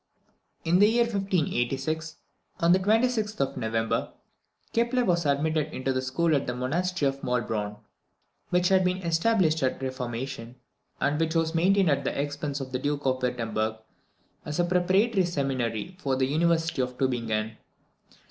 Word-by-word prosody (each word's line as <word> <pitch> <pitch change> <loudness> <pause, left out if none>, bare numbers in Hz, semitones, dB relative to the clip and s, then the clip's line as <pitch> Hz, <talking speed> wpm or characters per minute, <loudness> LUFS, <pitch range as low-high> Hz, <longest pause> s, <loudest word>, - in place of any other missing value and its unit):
In 170 +3 +3
the 205 - +7
year 235 +1 +3
1586, 160 - -1 0.4
on 170 +1 +4
the 185 - +5
26th 220 +1 +1
of 135 - 0
November, 115 0 -1 0.6
Kepler 240 +2 +2
was 170 -4 +1
admitted 155 +2 +1
into 130 -1 -2
the 130 - 0
school 150 +5 +1
at 140 - -1
the 125 - -2
Monastery 160 +5 0
of 135 0 -3
Maulbronn, 110 -4 -2 0.7
which 180 0 +2
had 190 -1 +4
been 180 0 +1
established 165 -1 +2
at 130 - 0
the 135 - -4
Reformation, 125 -1 -5 0.4
and 145 +2 +1
which 160 0 0
was 165 0 +1
maintained 185 +1 +3
at 140 - +1
the - - -2
expense 145 0 -3
of 130 -1 -6
the 125 - -2
Duke 145 +1 -2
of 130 -1 +1
Wirtemberg, 115 -3 -1 0.7
as 150 +3 -4
a - - +4
preparatory 185 +4 +2
seminary 135 - -2
for 135 -6 0
the 130 0 +1
University 165 +1 +1
of 125 0 -3
Tubingen. 115 -4 -1
150 Hz, 155 wpm, -27 LUFS, 130-180 Hz, 0.7 s, the